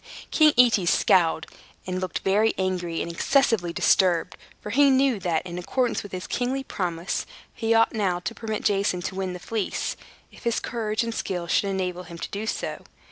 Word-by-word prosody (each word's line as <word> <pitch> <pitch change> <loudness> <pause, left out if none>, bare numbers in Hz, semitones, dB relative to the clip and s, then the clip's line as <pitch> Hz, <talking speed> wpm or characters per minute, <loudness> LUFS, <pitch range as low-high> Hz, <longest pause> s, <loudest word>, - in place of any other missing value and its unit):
King 310 -2 +5
Aetes 225 -8 +5
scowled, 165 -3 +3 0.4
and 185 0 -3
looked 185 -3 -3
very 210 +3 +3
angry 180 -3 -1
and 170 - -5
excessively 225 -2 +2
disturbed; 175 0 +2 0.2
for 210 - -7
he 280 +4 +5
knew 265 -4 +3
that, 175 -4 -1
in 175 0 -5
accordance 245 +7 0
with 205 - -10
his 185 -1 -5
kingly 260 +2 -2
promise, 175 -6 -3 0.3
he 225 0 +1
ought 225 0 +4
now 195 -5 0
to 200 +6 -4
permit 220 -2 -4
Jason 195 -3 +1
to - - -3
win 190 -1 -3
the 180 - -7
Fleece, 215 +2 -2 0.4
if - - -16
his 235 -1 +1
courage 220 -1 -2
and 230 0 -3
skill 180 -5 -3
should 195 +3 +1
enable 180 -2 -2
him 170 -1 -10
to - - -6
do 210 +2 -4
so. - - -3
195 Hz, 190 wpm, -25 LUFS, 180-230 Hz, 0.4 s, King